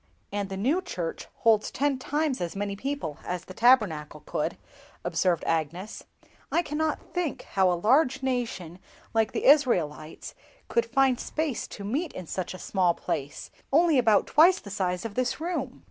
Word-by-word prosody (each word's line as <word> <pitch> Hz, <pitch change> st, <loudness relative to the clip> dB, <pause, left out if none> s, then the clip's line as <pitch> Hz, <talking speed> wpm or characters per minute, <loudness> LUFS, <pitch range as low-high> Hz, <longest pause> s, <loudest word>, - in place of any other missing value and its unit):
"And 200 Hz, -1 st, -2 dB
the 190 Hz, -, -5 dB
new 275 Hz, -, +1 dB
church 175 Hz, -, -5 dB
holds 220 Hz, -2 st, +4 dB
ten 280 Hz, -1 st, 0 dB
times 290 Hz, -2 st, -1 dB
as 175 Hz, +1 st, -3 dB
many 200 Hz, 0 st, -2 dB
people 260 Hz, -, -4 dB
as 180 Hz, -1 st, -4 dB
the 185 Hz, -, -10 dB
Tabernacle 180 Hz, -, +3 dB
could," -, -, -3 dB, 0.5 s
observed 175 Hz, -3 st, +1 dB
Agnes. 165 Hz, +6 st, -2 dB, 0.5 s
"I 340 Hz, -, +2 dB
cannot 305 Hz, 0 st, -2 dB
think 355 Hz, -5 st, -2 dB
how 190 Hz, -2 st, +2 dB
a 175 Hz, -, 0 dB
large 265 Hz, -, +3 dB
nation 225 Hz, -10 st, -2 dB, 0.3 s
like 225 Hz, -1 st, +2 dB
the -, -, -3 dB
Israelites 175 Hz, -, +2 dB, 0.4 s
could 235 Hz, 0 st, +1 dB
find 260 Hz, 0 st, +3 dB
space 310 Hz, -5 st, -2 dB
to 200 Hz, -, -9 dB
meet 285 Hz, -, -2 dB
in 185 Hz, -, -7 dB
such 185 Hz, +2 st, -4 dB
a -, -, -7 dB
small 180 Hz, -1 st, +1 dB
place, 140 Hz, +1 st, -4 dB, 0.2 s
only 320 Hz, -1 st, +5 dB
about 220 Hz, -4 st, +4 dB
twice 345 Hz, +5 st, +5 dB
the 200 Hz, -, -10 dB
size 185 Hz, -1 st, -1 dB
of 225 Hz, -, -4 dB
this 250 Hz, +3 st, -1 dB
room!" 315 Hz, -6 st, -3 dB
225 Hz, 165 wpm, -27 LUFS, 180-275 Hz, 0.5 s, only